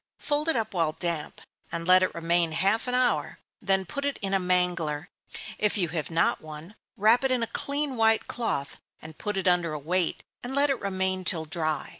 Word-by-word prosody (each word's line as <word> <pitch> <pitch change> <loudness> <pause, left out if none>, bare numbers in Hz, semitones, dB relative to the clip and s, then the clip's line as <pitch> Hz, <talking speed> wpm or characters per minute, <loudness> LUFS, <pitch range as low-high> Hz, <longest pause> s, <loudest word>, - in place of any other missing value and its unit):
Fold 295 +2 0
it 325 - +3
up 225 -3 -2
while 165 -4 +1
damp, 170 -4 -4 0.3
and 170 0 -4
let 185 0 +7
it 185 - 0
remain 170 0 +2
half 195 +9 +2
an 250 - 0
hour, 250 -1 +1 0.2
then 190 -1 +1
put 280 +10 -5
it 285 0 -1
in 195 0 -1
a 195 - +3
mangler 175 -4 0 0.5
if 210 0 +1
you 175 -4 0
have 160 -2 -3
not 165 0 +1
one, 155 +4 -10 0.2
wrap 220 +5 +4
it 265 - +2
in 255 -2 +1
a 230 - -5
clean 285 -1 -1
white 225 -1 +3
cloth, 220 -13 -3 0.2
and 155 0 -12
put 210 -1 -3
it 190 - -1
under 175 -3 +2
a - - -3
weight, 170 +4 -1 0.2
and 250 +2 -5
let 285 0 +3
it 265 - -2
remain 190 -1 -1
till 165 -3 +1
dry. 155 0 -2
185 Hz, 210 wpm, -27 LUFS, 165-225 Hz, 0.5 s, let